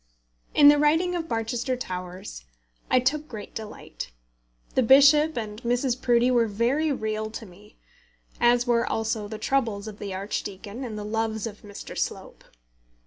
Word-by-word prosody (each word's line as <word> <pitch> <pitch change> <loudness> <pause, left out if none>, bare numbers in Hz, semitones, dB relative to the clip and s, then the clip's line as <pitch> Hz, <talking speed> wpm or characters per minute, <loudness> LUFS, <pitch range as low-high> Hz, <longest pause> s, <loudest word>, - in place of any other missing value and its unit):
In 290 - +8
the 290 0 +5
writing 325 +5 +3
of 330 -2 -4
Barchester 235 +3 -1
Towers 180 - -6 0.5
I 255 - +5
took 295 +4 0
great 215 -6 -9
delight. 215 - -7 0.6
The - - +3
bishop 285 +5 +6
and 215 -1 -5
Mrs. 245 +1 0
Proudie 240 0 +3
were 235 -2 +3
very 245 +9 +1
real 215 -4 -2
to 220 +1 -8
me, 205 +3 -17 0.6
as 240 0 +4
were 235 -1 +2
also 220 -1 -2
the 215 +1 -6
troubles 220 -4 -1
of 210 -1 -9
the 200 - -5
archdeacon 200 +4 -5
and 225 -4 -5
the 210 - -5
loves 220 0 -2
of 210 -2 -7
Mr. 205 -1 -9
Slope. - - -4
230 Hz, 155 wpm, -26 LUFS, 210-255 Hz, 0.6 s, In